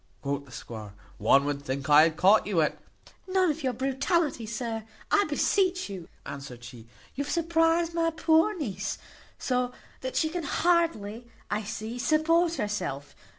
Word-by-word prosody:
quoth 140 0 -2
the 130 - -17
squire; 110 -4 -8 0.2
"one 135 +7 +4
would 145 -1 -2
think 135 +1 -4
I 150 0 +8
had 160 0 +3
caught 200 +4 +5
you 195 -5 +1
at 150 - 0 0.3
" - - -24
"None 370 -3 +4
of 315 - -6
your 260 -3 0
brutality, 270 - 0
sir, 225 0 -3 0.3
I 405 - +4
beseech 370 - +1
you," 185 -4 -7 0.2
answered 135 -4 -8
she. 120 -1 -11 0.3
"You 280 - -2
have - - -5
surprized 330 0 +2
my 330 0 +2
poor 325 +4 +3
niece 200 - -3 0.4
so, 250 -1 -1 0.3
that 260 0 -5
she 315 - +2
can 350 +2 -3
hardly, 280 -10 +1 0.2
I 210 +1 0
see, 220 +3 -5
support 330 +4 +3
herself. 185 - -3
240 Hz, 165 wpm, -28 LUFS, -, 0.4 s, I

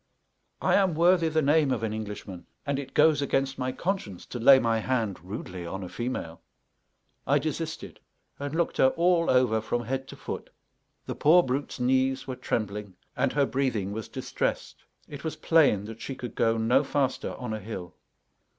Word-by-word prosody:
I - - +3
am 190 -5 +3
worthy 170 0 +4
the 155 0 +1
name 150 0 +4
of 120 -4 -1
an 110 -1 -1
Englishman, 105 -4 -7 0.2
and 140 -1 -1
it 140 - -8
goes 150 -1 +5
against 135 -1 0
my 130 0 -1
conscience 130 - -3
to 120 - -6
lay 135 +3 +8
my 115 -3 +1
hand 110 -5 -1
rudely 90 -2 -6
on 95 +3 -5
a 90 - -7
female. 120 -9 -4 0.9
I 140 - +4
desisted, 155 +2 -4 0.4
and 145 +2 -4
looked 170 0 0
her 130 - +6
all 170 0 +3
over 125 -4 +3
from 120 +2 -2
head 135 +3 -3
to - - -9
foot; - - -6 0.6
the - - -3
poor 175 +4 +5
brute's 130 +2 -3
knees 130 +1 +1
were 130 - -4
trembling 105 -5 -3 0.2
and - - +1
her 145 -1 +3
breathing 125 -8 -1
was 110 0 -5
distressed; - - -3 0.3
it 145 -1 -9
was 160 - -3
plain 140 -12 +3
that 115 +1 -9
she 135 - -5
could 125 -2 -7
go 115 0 +2
no 120 +5 +3
faster 135 -2 -1
on 125 -3 -5
a 110 - -3
hill. 95 -4 -7
130 Hz, 180 wpm, -27 LUFS, 110-145 Hz, 0.9 s, lay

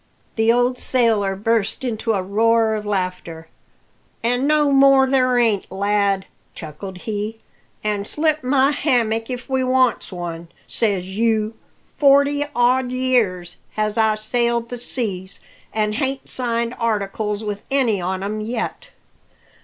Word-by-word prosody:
The 225 0 +3
old 245 +1 +1
sailor 220 -6 +1
burst 220 +2 0
into 225 -2 -1
a 190 -3 -1
roar 225 +3 +2
of 210 -1 -4
laughter. 180 -4 -3 0.7
"An' 245 +3 +1
no 300 -1 +3
more 275 -1 +6
there 255 -2 +2
ain't, 225 -5 +1
lad," 200 0 +1 0.3
chuckled 180 +4 -8
he; 215 0 -3 0.5
"an' 205 -1 -1
slit 305 +3 0
my 265 +2 +3
hammock 230 -6 0
if 250 0 -5
we 265 -1 0
wants 255 -3 +1
one, 170 -2 -6 0.2
says 200 -5 0
you. 220 -1 +1 0.4
Forty 285 0 +4
odd 250 +1 +3
year 245 -8 +1 0.3
has 215 -1 -1
I 220 -1 +3
sailed 235 +2 -1
the 245 - -5
seas, 195 -7 -3 0.3
an' 215 -1 0
hain't 270 +3 -2
signed 235 -1 -1
articles 210 -1 -1
with 205 -1 -4
any 245 -8 +1
on 185 +2 -2
'em 215 +2 -3
yet. 235 - -4
225 Hz, 135 wpm, -21 LUFS, 205-255 Hz, 0.7 s, more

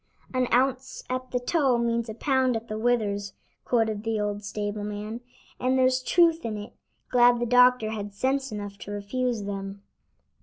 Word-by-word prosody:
"An 255 -1 +1
ounce 260 +1 +1
at 255 0 -3
the 250 - -1
toe 265 -1 +2
means 235 -1 0
a 220 - -6
pound 260 0 +1
at 225 +1 -4
the 215 -1 -4
withers," 210 -4 0 0.3
quoted 220 -3 0
the 225 -1 -1
old 205 0 -2
stable 205 0 -4
man. 210 +3 -5 0.4
"And 255 +1 +1
there's 260 0 +3
truth 335 +3 +3
in 220 -2 -3
it; 210 +2 -8 0.4
glad 245 -1 +5
the 240 - 0
doctor 250 -2 +5
had 205 -2 -5
sense 265 +3 0
enough 205 -1 -6
to - - -9
refuse 215 +3 -2
them." 195 0 -6
235 Hz, 175 wpm, -26 LUFS, 205-255 Hz, 0.4 s, glad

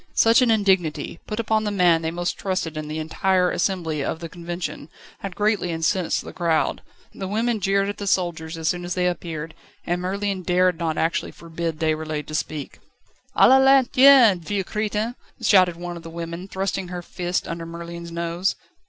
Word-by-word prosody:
Such 230 +3 +5
an 250 - +3
indignity, 190 -7 +1
put 210 - -4
upon 220 -1 +1
the 210 - -1
man 180 -5 +3
they 160 - -1
most 175 +1 -2
trusted 185 -5 -3
in 155 0 -5
the 155 +1 -4
entire 180 +4 +1
assembly 170 -5 -1
of 160 - -3
the 165 0 -7
Convention, 170 -2 -6 0.3
had 195 -2 -6
greatly 210 -3 +1
incensed 165 +2 0
the - - -9
crowd. 165 -3 0 0.3
The 190 - -5
women 225 +3 0
jeered 195 +1 +1
at 205 - -5
the 200 - -4
soldiers 165 -4 -1
as 160 -1 -3
soon 175 +1 0
as 175 0 -3
they 180 -1 +1
appeared, 165 -3 -3 0.3
and 175 +1 -1
Merlin 195 +1 -2
dared 180 -1 +2
not 160 -2 -1
actually 165 +1 0
forbid 165 -1 -5
Déroulède 155 -2 -1
to 155 - -9
speak. 155 -1 -4 0.6
"A - - +7
la 265 - +7
lanterne, 265 -5 +6
vieux 195 +4 -2
crétin!" 215 +3 -2 0.3
shouted 185 -6 +4
one 175 +1 -6
of 170 - -8
the 165 - -9
women, 170 +2 -6
thrusting 195 -1 -3
her 175 0 -6
fist 175 +1 -3
under 165 0 -5
Merlin's 170 0 -8
nose. 170 +2 -1
175 Hz, 185 wpm, -23 LUFS, 165-195 Hz, 0.6 s, A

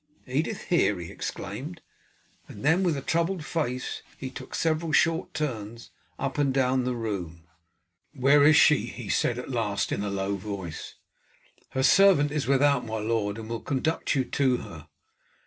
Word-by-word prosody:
"Edith 150 - -2
here!" 165 - +2
he 85 -1 -7
exclaimed, - - -6 0.7
and - - -9
then 165 +5 +4
with 170 -6 +1
a 135 - -5
troubled 170 0 0
face 130 -7 -3 0.2
he 130 -1 -6
took - - -8
several 160 0 0
short 165 +2 +2
turns 115 -7 -4 0.3
up 135 +1 -3
and 140 -2 +2
down 130 -1 +1
the 125 -1 -1
room. 90 -8 -4 0.7
"Where 140 +2 +5
is 150 +1 +7
she?" 150 -1 +5
he - - -8
said - - +1
at - - -6
last - - -1
in 100 - -1
a 105 - -2
low 100 0 -2
voice. 95 -4 -6 0.8
"Her 130 - 0
servant 180 -4 +5
is 150 -4 -2
without, 140 -1 +3
my 110 -1 -4
lord, 105 -1 -1
and 110 -1 -7
will 115 0 -4
conduct 155 +4 -1
you 130 -2 +1
to 130 0 +1
her." 80 -6 -10
130 Hz, 165 wpm, -27 LUFS, 110-150 Hz, 0.8 s, is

